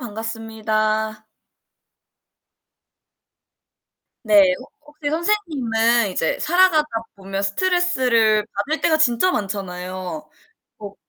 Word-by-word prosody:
반갑습니다. 220 -1 -3 3.0
네 205 -4 +5
혹 255 - -13
혹시 295 0 -6
선생님은 265 - +1
이제 165 -3 -1
살아가다 345 -2 +3 0.3
보면 195 0 -5
스트레스를 245 - +2 0.2
받을 315 +2 -2
때가 315 -2 +3
진짜 280 +3 +3
많잖아요. 185 - -5 0.5
뭐 205 -1 -9
225 Hz, 200 characters per minute, -21 LUFS, 200-300 Hz, 3.0 s, 네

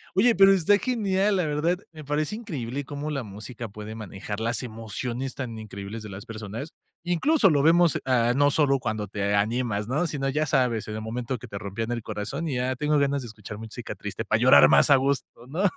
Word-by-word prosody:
Oye, 235 +5 +5
pero 195 +1 +7
está 195 +2 +4
genial, 205 -5 +1
la 175 - +1
verdad, 155 +4 0
me 155 -2 -10
parece 150 +6 -1
increíble 145 - -4
cómo 145 +2 -5
la 140 -2 -2
música 110 +3 -8
puede 105 +1 -8
manejar 105 -1 -6
las 115 +2 -1
emociones 120 +3 -4
tan 115 -5 -5
increíbles 105 +1 -7
de 105 - -8
las 100 +4 -8
personas. 115 +5 -7 0.3
Incluso, 195 - +3
lo 145 - +3
vemos, 170 0 +5
ah, 120 -2 +3
no 145 +1 +4
solo 140 -3 +3
cuando 110 -4 -3
te 100 0 -1
animas, 105 0 0
¿no?, 150 +7 0
sino, 135 -3 -2
ya 150 +3 0
sabes, 125 -6 +1
en 105 - -5
el 110 - -4
momento 120 +3 -3
que 125 - -11
te 100 -2 -6
rompían 110 +3 -4
el 120 -1 -2
corazón, 135 +12 -4
y 140 - -2
ya 125 +1 0
tengo 150 +3 +1
ganas 140 0 +1
de 120 - -7
escuchar 105 -1 -9
música 110 -1 -7
triste - - -5
para - - +1
llorar - - +8
más - - +5
a 140 - +8
gusto, 135 +1 +1 0.2
¿no? 160 +9 -2
130 Hz, 215 wpm, -26 LUFS, 110-150 Hz, 0.3 s, llorar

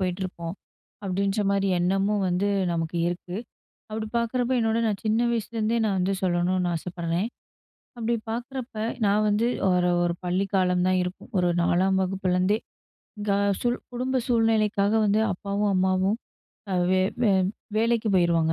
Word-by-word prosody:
போயிட்டுருப்போம், 180 -2 -3 0.5
அப்டீன்ற 195 +2 0
மாரி 200 0 +1
எண்ணமும் 195 +3 +1
வந்து 180 +3 +1 0.3
நமக்கு 165 0 -2
இருக்கு. 175 +1 -5 0.5
அப்படி 215 0 -4
பாக்குறப்போ 245 +2 0
என்னோட 225 0 +1
நான் 205 -2 -2
சின்ன 220 +2 +2
வயசுலருந்தே 230 0 -1
நான் 200 -2 +1
வந்து 185 +2 +1
சொல்லணும்னு 180 0 +1
ஆசைப்பட்றேன். 170 +3 -2 0.7
அப்பிடி 235 0 0 0.2
பாக்குறப்ப, 245 +1 -5 0.3
நான் 205 +1 +3
வந்து 210 +3 +2 0.2
ஒரு 180 -1 +3
ஒரு 175 - +1
பள்ளிக் 190 +3 -1
காலம் 180 -1 +2
தான் 185 0 +3
இருக்கும். 180 +1 -7
ஒரு 180 -1 +2
4 190 +3 +2
வகுப்புலருந்தே 185 +1 +1 0.6
எங்க 205 -1 -1 0.3
சூழ் 240 0 +1 0.2
குடும்ப 255 +2 -1
சூழ்நிலைக்காக 220 -4 +2
வந்து 210 +1 +3
அப்பாவும் 200 +2 -1
அம்மாவும் 190 +1 +2 0.6
அ - - +1 0.2
வே 185 - +3 0.2
வே 220 - +4 0.5
வேலைக்கு 230 0 +2
போயிருவாங்க. 170 -3 +3
195 Hz, 135 wpm, -25 LUFS, 180-220 Hz, 0.7 s, வே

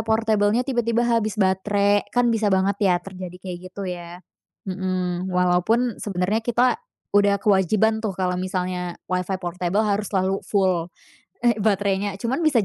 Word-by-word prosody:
portabelnya 220 +1 +2
tiba-tiba 240 -3 0
habis 230 -2 +1
baterai, 200 +1 +2
kan 245 -1 +2
bisa 220 -2 +1
banget 190 +1 +2
ya, 180 - +4
terjadi 185 -2 -8
kayak 180 -1 -7
gitu, 195 +2 -7
ya. 175 -1 -7 0.4
Mhm, 185 -1 -2
walaupun 180 +7 +2
sebenernya 205 +3 -1
kita 245 - +2 0.4
udah 200 -1 +4
kewajiban 215 +3 +2
tuh, 210 - 0
kalau 180 -1 -1
misalnya 180 -1 -3
Wi-Fi 185 +1 -1
portabel 180 +2 -1
harus 210 -1 -1
selalu 190 0 0
full, 185 -4 0 0.5
eh, 240 - +6
baterainya. 200 -1 0
Cuman 235 +9 -2
bisa 280 -10 +3
195 Hz, 140 wpm, -23 LUFS, 185-220 Hz, 0.5 s, eh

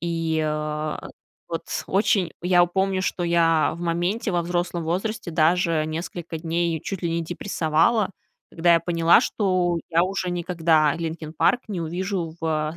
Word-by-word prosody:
И, 165 -2 -1
а, 150 0 -3 0.4
вот 165 - -4 0.2
очень 195 -3 +1
я 175 0 +4
помню, 190 +1 0
что 185 - -2
я 165 -2 +3
в 170 - -10
моменте, 175 +6 -1
во 175 - +1
взрослом 175 0 -2
возрасте 185 +3 -2
даже 165 0 +2
несколько 165 +1 -5
дней 165 0 -1
чуть 195 -2 -5
ли 170 - 0
не 165 0 -1
депрессовала, 175 +4 +1 0.4
когда 170 +1 +3
я 165 - +3
поняла, 170 +2 +4
что 185 -7 0
я 165 +1 +4
уже 185 0 -2
никогда 165 -4 +2
"Линкин 160 -1 -5
Парк" 245 +9 +2
не 195 -5 -3
увижу 175 0 -3
в 155 0 -1
170 Hz, 150 wpm, -24 LUFS, 160-180 Hz, 0.4 s, я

